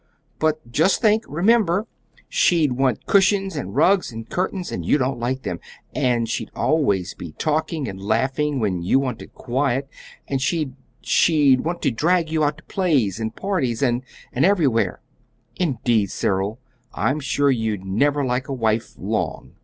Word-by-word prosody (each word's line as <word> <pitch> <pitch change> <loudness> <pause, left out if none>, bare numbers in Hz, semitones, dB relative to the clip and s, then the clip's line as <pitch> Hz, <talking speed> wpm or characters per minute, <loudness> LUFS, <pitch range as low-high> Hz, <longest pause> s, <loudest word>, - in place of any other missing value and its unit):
"But 155 -5 -1
just 160 +10 +3
think 220 -1 +3
remember! 195 +4 +2 0.4
She'd 170 - +3
want 130 -2 0
cushions 195 -2 +3
and 100 -9 -5
rugs 180 +4 +3
and 115 0 -8
curtains, 185 0 -2
and - - -4
you - - +3
don't 130 -2 -1
like 130 +2 -2
them; 85 - -4 0.3
and 120 -3 +1
she'd 115 - -3
always 100 - +1
be 85 -3 -9
talking 155 -2 -1
and 95 0 -7
laughing 130 +7 0
when 95 -6 -1
you 90 +9 +2
wanted 130 -4 -3
quiet; 135 +1 -1 0.4
and 135 -2 -1
she 155 -1 0 0.3
she'd 145 -6 +4
want 170 +2 -3
to - - +2
drag 165 +6 +1
you 160 -1 +1
out 145 0 0
to 165 - -16
plays 135 - 0
and 110 0 -3
parties 140 - -1
and 120 -1 +1 0.3
and 125 - +1
everywhere. 160 - +2 0.6
Indeed, 120 - +1
Cyril, 100 +3 -1 0.4
I'm 140 +3 0
sure 140 0 +1
you'd 110 -6 -2
never 140 +9 +1
like 125 +2 -1
a 140 - -3
wife 110 -3 -1
long!" - - -3
135 Hz, 160 wpm, -22 LUFS, 115-160 Hz, 0.6 s, she'd